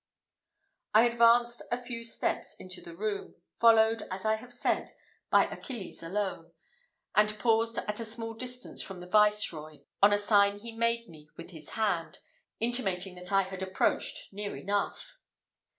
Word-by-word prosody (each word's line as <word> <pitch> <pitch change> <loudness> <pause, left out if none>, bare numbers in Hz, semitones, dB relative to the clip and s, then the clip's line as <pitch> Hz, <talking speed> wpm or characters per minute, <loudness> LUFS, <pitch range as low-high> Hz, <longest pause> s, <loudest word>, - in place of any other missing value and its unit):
I 225 +2 +8
advanced 235 0 +4
a 240 - +1
few 245 -1 -6
steps 230 - -2
into 185 0 -11
the 170 - -11
room, 205 +2 -4 0.2
followed, 225 -1 +5
as 190 +2 -6
I 215 - +3
have 245 +2 -13
said, 245 - -1 0.4
by - - +5
Achilles 235 -8 -7
alone, 170 -2 -3 0.6
and 210 0 +3
paused 230 0 +2
at 210 +1 -2
a - - -2
small 225 0 -2
distance 250 +2 0
from 190 -2 -6
the 180 - -9
Viceroy, 180 -6 +2 0.2
on 200 +1 +7
a 205 - +4
sign 205 -1 +4
he 230 +3 -8
made 230 0 0
me 150 -2 -15
with 170 +2 -10
his 160 -3 -10
hand, 175 -8 -1 0.4
intimating 195 -6 -1
that 180 +1 -9
I 195 0 +4
had 190 0 -7
approached 190 +1 -1
near 205 +1 -4
enough. 205 - -3
210 Hz, 155 wpm, -30 LUFS, 190-230 Hz, 0.6 s, I